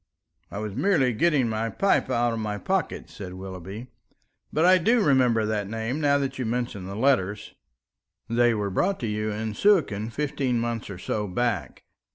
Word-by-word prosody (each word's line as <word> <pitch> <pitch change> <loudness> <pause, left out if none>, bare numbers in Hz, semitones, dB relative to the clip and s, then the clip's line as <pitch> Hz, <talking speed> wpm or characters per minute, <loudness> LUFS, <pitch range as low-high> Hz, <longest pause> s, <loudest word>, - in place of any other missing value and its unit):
"I - - -7
was 105 -1 -4
merely 140 - +2
getting 140 +1 +2
my 110 0 -1
pipe 195 - +1
out 120 -2 +1
of 115 - -3
my 105 -1 -3
pocket," 190 - -2
said 90 -3 -9
Willoughby. 95 +4 -7 0.7
"But 160 - +2
I 185 +1 +6
do 230 +8 +3
remember 130 - +3
the 105 -1 -1
name 115 +7 -3
now 145 -1 +4
that 135 -1 -3
you - - 0
mention 115 -5 -3
the 100 - -6
letters." 105 -5 +1 0.7
"They 120 0 +3
were 100 -2 -2
brought 190 - 0
to 115 - -1
you 105 0 -2
in 110 +1 -3
Suakin 115 - +2
fifteen 135 -2 -1
months 115 -2 -3
or 100 - -6
so 105 +3 -3
back. 100 - -2
115 Hz, 180 wpm, -25 LUFS, 105-135 Hz, 0.7 s, I